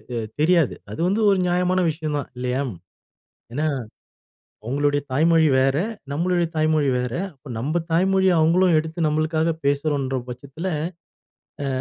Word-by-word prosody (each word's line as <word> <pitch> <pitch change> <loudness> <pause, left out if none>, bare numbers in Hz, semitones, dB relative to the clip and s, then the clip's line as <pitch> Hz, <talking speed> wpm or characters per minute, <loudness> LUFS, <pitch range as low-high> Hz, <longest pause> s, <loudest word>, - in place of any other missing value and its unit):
அ 115 - -1 0.2
தெரியாது. 165 -3 +3 0.2
அது - - -8
வந்து 205 +4 +1
ஒரு 195 -1 +3
நியாயமான 180 +1 +2
விஷயம் 155 -1 -3
தான், - - -6
இல்லையா. 125 +2 -1
ம் 90 - -10 0.8
ஏன்னா, 150 +4 0 1.0
அவங்களுடைய 145 +3 +1
தாய்மொழி 160 +3 +4
வேற, 135 +1 +2 0.3
நம்மளுடைய 175 +2 +1
தாய்மொழி 155 -2 +2
வேற, 125 -1 -3 0.2
அப்போ 135 0 -15
நம்ப 155 +7 -1
தாய்மொழிய, 190 +2 +3
அவுங்களும் 175 +2 +4
எடுத்து, 160 +2 -6
நம்பளுக்காக 155 +2 +1 0.2
பேசுறோன்ற 140 -2 0
பட்சத்தில, 140 +8 -6 1.0
அ - - -1
155 Hz, 130 wpm, -23 LUFS, 140-170 Hz, 1.0 s, தாய்மொழி